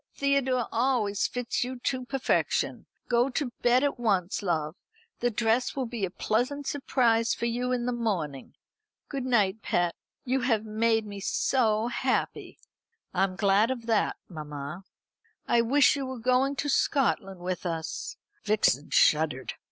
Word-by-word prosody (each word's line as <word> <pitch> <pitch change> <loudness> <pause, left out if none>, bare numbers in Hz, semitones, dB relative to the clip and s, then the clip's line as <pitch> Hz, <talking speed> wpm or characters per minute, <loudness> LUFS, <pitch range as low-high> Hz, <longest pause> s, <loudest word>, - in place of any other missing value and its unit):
Theodore 265 -3 +1
always 230 -4 +1
fits 245 -1 -2
you 255 +1 -5
to 255 -1 -2
perfection. 270 0 0 0.2
Go 240 +2 +2
to 270 -1 -2
bed 245 +2 +4
at 285 -3 0
once, 195 -6 0
love. 160 -4 -1 0.4
The 245 - +1
dress 230 +2 +1
will 265 -2 -1
be 230 -4 -2
a - - -5
pleasant 250 +9 -1
surprise 235 -5 +1
for - - -3
you 245 +2 -1
in 245 -1 0
the 250 - 0
morning. 185 - -3 0.5
Good 275 -3 -3
night, 220 -4 +2
pet. 175 -3 0 0.3
You 260 +1 +1
have 225 -4 +1
made 225 +1 +1
me 200 -1 -7
so 220 +1 +1
happy." - - -2 0.6
"I 190 +1 +3
am 185 -1 -6
glad 200 +3 +3
of 245 -3 -4
that, 225 -2 +1
mamma." 155 +1 -7 0.6
"I 235 - +4
wish 275 +6 +4
you 275 -2 -3
were 260 0 -5
going 255 +4 +2
to 280 +2 -2
Scotland 230 -9 +1
with 180 +1 -4
us." 165 -2 -4 0.3
(Vixen 205 - +2
shuddered.) 150 -4 +2
230 Hz, 150 wpm, -28 LUFS, 195-255 Hz, 0.6 s, bed